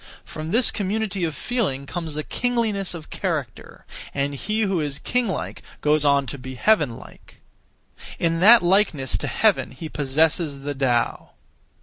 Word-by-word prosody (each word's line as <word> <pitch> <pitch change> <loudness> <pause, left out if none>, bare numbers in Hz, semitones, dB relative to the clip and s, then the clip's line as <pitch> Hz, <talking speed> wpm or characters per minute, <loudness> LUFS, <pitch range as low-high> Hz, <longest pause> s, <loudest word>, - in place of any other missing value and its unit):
From 155 0 -7
this 230 +7 +5
community 200 -1 -2
of 160 -3 -3
feeling 185 - -2
comes 160 0 -5
a 155 - -1
kingliness 220 -6 -1
of 155 -2 -10
character; 155 - -4 0.3
and 140 0 -1
he 215 +10 -2
who 195 -5 +1
is 145 -2 -2
king 250 +8 -1
like 190 - -4 0.2
goes 150 0 +3
on 140 -1 +3
to 140 +1 -6
be 130 +1 -8
heaven 150 - +2
like. - - -15 0.8
In 165 -1 0
that 220 +5 +7
likeness 175 - +2
to - - -4
heaven - - +2
he 155 +5 -8
possesses 150 +1 0
the 145 +1 -3
Tao. 130 -3 -1
160 Hz, 155 wpm, -23 LUFS, 140-200 Hz, 0.8 s, that